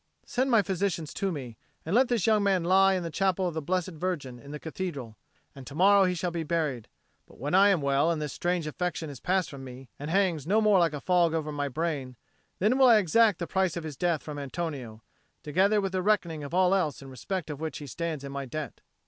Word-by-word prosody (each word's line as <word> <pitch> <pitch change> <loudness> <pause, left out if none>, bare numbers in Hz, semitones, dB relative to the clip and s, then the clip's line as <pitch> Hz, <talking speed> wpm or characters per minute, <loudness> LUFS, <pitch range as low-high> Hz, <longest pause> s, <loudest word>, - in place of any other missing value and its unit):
Send 260 +2 0
my 230 -4 +4
physician 190 -3 -1
to 195 +5 -3
me. 125 -8 -7 0.3
And 165 - -3
let 255 +3 +5
this 235 -6 0
young 215 -2 +4
man 195 -3 +2
lie 190 +2 +4
in 180 - -2
the 165 - -5
Chapel 190 +1 +1
of 175 - -3
the 160 - -3
Blessed 180 +4 -1
Virgin 155 -7 -4
in 140 - -13
the 150 - -5
Cathedral, 150 - -5 0.4
and 135 -2 -11
to 140 - -9
morrow 195 +3 +5
he 180 -1 0
shall 175 +1 -2
be 170 -1 -3
buried. 150 -8 -2 0.4
But - - -18
when 145 +5 -4
I 195 +2 +6
am 190 -6 +2
well, 140 +3 +2
and 165 -2 0
this 150 -2 -4
strange 175 -2 -1
affection 160 -1 -3
is 135 - -10
passed 180 -3 0
from 140 -2 -9
me, 130 -1 -10
and 145 +2 -5
hangs 170 -5 +1
no 210 +4 +3
more 210 -3 +4
like 170 -3 +2
a 145 - -5
fog 175 -3 +2
over 155 -1 -2
my 145 -1 -2
brain, 140 -3 -3 0.4
then 210 +6 +2
I - - 0
will 265 -2 +6
exact 215 -1 +4
the 170 - -3
price 190 -1 0
of 170 - -4
his 155 -3 -6
death 170 0 0
from 150 -1 -6
Antonio, 135 -7 -5 0.4
together 195 +8 +2
with 195 -2 -2
the 185 -1 -1
reckoning 175 -6 0
of 140 - -7
all 185 +1 +3
else 155 -8 0
in 135 - -11
respect 155 +6 -4
of 145 0 -7
which 160 -3 -4
he 150 - -8
stands 155 +1 -4
in 140 - -6
my 140 0 -4
debt." 155 +3 -6
170 Hz, 245 wpm, -28 LUFS, 145-190 Hz, 0.4 s, I